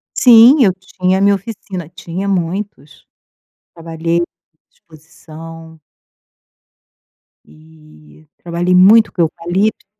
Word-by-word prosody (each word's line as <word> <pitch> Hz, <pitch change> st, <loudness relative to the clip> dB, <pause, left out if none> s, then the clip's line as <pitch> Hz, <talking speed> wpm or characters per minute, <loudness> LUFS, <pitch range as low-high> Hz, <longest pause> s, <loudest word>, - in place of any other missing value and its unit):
Sim, 250 Hz, +3 st, +6 dB
eu 190 Hz, -, +1 dB
tinha 185 Hz, 0 st, -3 dB
a -, -, -2 dB
minha 200 Hz, 0 st, +3 dB
oficina, 195 Hz, -5 st, -8 dB
tinha 180 Hz, +2 st, -7 dB
muitos. 180 Hz, -5 st, -5 dB, 0.7 s
Trabalhei 165 Hz, +1 st, -3 dB, 0.5 s
exposição. 160 Hz, 0 st, -15 dB, 1.7 s
E 155 Hz, -, -21 dB
trabalhei 175 Hz, +1 st, -2 dB
muito 210 Hz, +5 st, +5 dB
com 175 Hz, -, -2 dB
eucalipto. 175 Hz, +6 st, -2 dB
175 Hz, 90 wpm, -15 LUFS, 160-195 Hz, 1.7 s, Sim